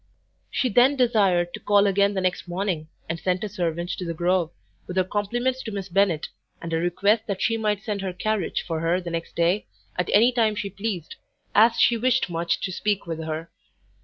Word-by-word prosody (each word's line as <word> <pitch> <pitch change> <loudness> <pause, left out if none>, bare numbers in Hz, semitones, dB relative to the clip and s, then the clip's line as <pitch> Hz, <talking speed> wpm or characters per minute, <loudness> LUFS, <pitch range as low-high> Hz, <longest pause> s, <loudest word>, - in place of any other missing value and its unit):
She 255 - 0
then 245 +6 +5
desired 210 -9 +3
her 175 - -20
to - - -5
call 205 0 +3
again 200 0 +2
the 190 - 0
next 185 0 -1
morning 175 -3 -2 0.2
and 160 +1 -3
sent 185 +2 -1
a 215 - -3
servant 175 -2 -2
to - - -4
the 170 -1 -4
Grove, 175 0 +1 0.4
with 180 - -5
her 185 - +4
compliments 240 +7 -1
to 220 - -6
Miss 195 -2 -5
Bennet, 180 -4 +1 0.3
and 165 -1 -6
a - - +2
request 200 +6 +1
that 200 -3 -2
she 225 - +1
might 210 -3 -1
send 210 -3 -3
her 190 -1 -2
carriage 205 +1 -1
for 165 -2 -2
her 165 +3 +1
the 175 -2 -6
next 165 0 -5
day, 175 +5 +1 0.3
at 180 -1 -1
any 235 +4 +6
time 225 -3 +2
she 200 -1 -4
pleased, 200 -5 -4 0.4
as 225 +2 +6
she 235 - +5
wished 255 -4 +1
much 170 0 0
to 185 - -2
speak 205 +2 -1
with 165 -2 -4
her. 160 +1 -5
195 Hz, 215 wpm, -24 LUFS, 175-215 Hz, 0.4 s, any